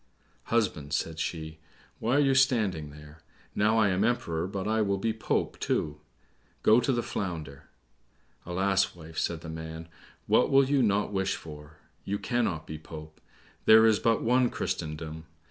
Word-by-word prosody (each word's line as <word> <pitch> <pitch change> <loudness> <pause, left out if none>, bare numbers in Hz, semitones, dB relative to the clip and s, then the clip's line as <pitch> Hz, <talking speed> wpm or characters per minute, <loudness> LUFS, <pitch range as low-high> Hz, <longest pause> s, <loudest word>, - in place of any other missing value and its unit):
"Husband," 95 -11 0
said 80 0 -2
she, 80 -1 -4 0.4
"why 120 +4 +1
are - - +5
you 135 -2 +3
standing 110 - +2
there? 75 +2 -14 0.3
Now, 110 +2 +2
I 110 -2 +4
am 95 +1 +1
Emperor, 90 -8 0
but 95 0 -4
I 110 0 +1
will 100 -2 +1
be 110 +3 -1
Pope 110 - -2
too; 75 0 -1 0.6
go 110 +2 +6
to 135 - +1
the 120 -2 0
Flounder." 85 - -5 0.7
"Alas, 95 +2 +1
wife," 80 -1 -7
said 85 -2 -2
the 80 - -9
man, 80 0 -7 0.4
"what - - +3
will 135 0 +5
you 140 -1 +3
not 105 -2 +1
wish 95 0 0
for? 75 -1 -11 0.3
You 100 - -2
cannot 110 -10 -1
be 80 0 -7
Pope. 80 -1 -11 0.4
There 110 +1 +8
is 110 -2 +4
but 115 -1 +1
one 125 +2 +3
in - - +1
Christendom. 80 +1 -4
95 Hz, 165 wpm, -28 LUFS, 80-110 Hz, 0.7 s, There